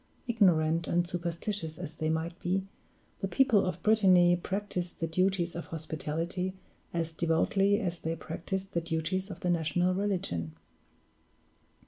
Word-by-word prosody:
Ignorant 170 Hz, -8 st, +3 dB
and 175 Hz, 0 st, +1 dB
superstitious 170 Hz, -1 st, -3 dB
as 160 Hz, -3 st, -7 dB
they 155 Hz, -, 0 dB
might 160 Hz, +2 st, -2 dB
be, 185 Hz, +2 st, 0 dB, 0.6 s
the 195 Hz, -, -1 dB
people 215 Hz, 0 st, +4 dB
of 180 Hz, -1 st, -4 dB
Brittany 185 Hz, -5 st, +6 dB
practiced 180 Hz, -1 st, -3 dB
the 165 Hz, -, 0 dB
duties 180 Hz, +1 st, +1 dB
of 170 Hz, -, -5 dB
hospitality 165 Hz, +4 st, -3 dB, 0.4 s
as 165 Hz, -1 st, -1 dB
devoutly 185 Hz, +5 st, +2 dB
as 175 Hz, -5 st, -2 dB
they 165 Hz, +1 st, -2 dB
practiced 190 Hz, +4 st, -4 dB
the 170 Hz, -, +1 dB
duties 170 Hz, +4 st, -2 dB
of 190 Hz, -, -8 dB
the 180 Hz, -, +1 dB
national 175 Hz, +2 st, +1 dB
religion. 175 Hz, -, -2 dB
175 Hz, 135 wpm, -30 LUFS, 165-190 Hz, 0.6 s, Brittany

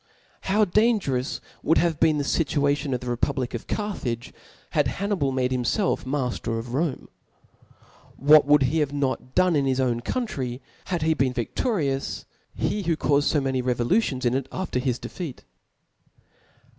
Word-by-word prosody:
How 210 Hz, +2 st, +4 dB
dangerous 190 Hz, -, +1 dB, 0.2 s
would 160 Hz, -, +3 dB
have 165 Hz, -3 st, +1 dB
been 160 Hz, -2 st, +4 dB
the 145 Hz, -, 0 dB
Situation 145 Hz, -1 st, +1 dB
of 125 Hz, -, -4 dB
die 125 Hz, -, -7 dB
republic 125 Hz, +1 st, -1 dB
of 120 Hz, -, -5 dB
Carthage, 130 Hz, -, -3 dB, 0.4 s
had -, -, +2 dB
Hannibal 195 Hz, -9 st, -1 dB
made 130 Hz, -1 st, 0 dB
him 130 Hz, -1 st, 0 dB
iclf 190 Hz, -, 0 dB
mafter 125 Hz, -4 st, -2 dB
of 120 Hz, +1 st, -6 dB
Rome? 145 Hz, 0 st, -1 dB, 1.1 s
What 145 Hz, +1 st, +6 dB
would 145 Hz, -1 st, +5 dB
not 130 Hz, -, +2 dB
he 160 Hz, -, +1 dB
have 150 Hz, -2 st, +1 dB
/done 145 Hz, +5 st, +1 dB
in 140 Hz, -2 st, +2 dB
his 130 Hz, 0 st, +1 dB
own 125 Hz, -3 st, +1 dB
country, 130 Hz, -, -3 dB, 0.3 s
had 175 Hz, -4 st, -2 dB
he 160 Hz, 0 st, +3 dB
been 135 Hz, -4 st, 0 dB
vidoriou^^ 140 Hz, -, -1 dB, 0.3 s
^e 210 Hz, -3 st, -1 dB
who 165 Hz, -2 st, +2 dB
cauied 145 Hz, -2 st, +2 dB
fb 145 Hz, -3 st, +2 dB
many 130 Hz, -1 st, 0 dB
revolutions 125 Hz, -, +1 dB
in 120 Hz, -, +2 dB
it 135 Hz, 0 st, -1 dB
after 185 Hz, -9 st, -2 dB
hi^ 125 Hz, -1 st, -1 dB
defeat 165 Hz, -9 st, -7 dB, 0.7 s
♦? -, -, -31 dB
140 Hz, 165 wpm, -25 LUFS, 125-165 Hz, 1.1 s, What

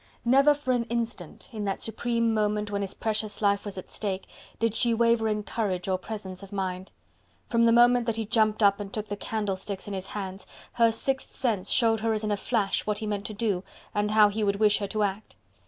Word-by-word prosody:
Never 275 Hz, +4 st, +5 dB
for 285 Hz, -3 st, -2 dB
an 245 Hz, -2 st, +1 dB
instant, 230 Hz, -8 st, -4 dB
in 215 Hz, -3 st, -4 dB
that 195 Hz, -1 st, -2 dB
supreme 230 Hz, +1 st, 0 dB
moment 210 Hz, -1 st, 0 dB
when 200 Hz, 0 st, -1 dB
his 195 Hz, -1 st, -3 dB
precious 215 Hz, -1 st, -1 dB
life 200 Hz, -1 st, +2 dB
was 200 Hz, -2 st, -5 dB
at 185 Hz, -, -7 dB
stake, 195 Hz, -3 st, -3 dB, 0.3 s
did 230 Hz, -2 st, +1 dB
she 235 Hz, 0 st, +2 dB
waver 230 Hz, -1 st, +3 dB
in 210 Hz, -1 st, -1 dB
courage 195 Hz, -5 st, -2 dB
or 185 Hz, -1 st, 0 dB
presence 190 Hz, -2 st, -7 dB
of 195 Hz, 0 st, -11 dB
mind. 190 Hz, -1 st, -3 dB, 0.6 s
From 230 Hz, -1 st, +2 dB
the -, -, +5 dB
moment 240 Hz, 0 st, +5 dB
that 230 Hz, -, +1 dB
he 225 Hz, -1 st, -2 dB
jumped 215 Hz, 0 st, +2 dB
up 200 Hz, 0 st, +5 dB
and 200 Hz, -1 st, -6 dB
took 215 Hz, -1 st, -4 dB
the 205 Hz, -, -2 dB
candlesticks 200 Hz, -2 st, -3 dB
in 205 Hz, -, -4 dB
his 190 Hz, 0 st, -4 dB
hands, 195 Hz, -1 st, -6 dB, 0.3 s
her 230 Hz, -1 st, +4 dB
sixth 265 Hz, +4 st, -1 dB
sense 210 Hz, -7 st, -1 dB
showed 225 Hz, -2 st, +3 dB
her 225 Hz, +1 st, 0 dB
as 215 Hz, -, -2 dB
in 210 Hz, -, -1 dB
a -, -, +2 dB
flash 205 Hz, -1 st, 0 dB
what 210 Hz, -1 st, 0 dB
he 220 Hz, -, -4 dB
meant 205 Hz, -2 st, -2 dB
to 215 Hz, -, -7 dB
do 200 Hz, -4 st, -1 dB, 0.3 s
and 205 Hz, 0 st, 0 dB
how 210 Hz, -1 st, +6 dB
he 215 Hz, +1 st, -2 dB
would 200 Hz, -1 st, +2 dB
wish 210 Hz, 0 st, +3 dB
her 200 Hz, -, -2 dB
to 215 Hz, +2 st, -1 dB
act. 200 Hz, +1 st, -3 dB
210 Hz, 230 wpm, -27 LUFS, 200-230 Hz, 0.6 s, how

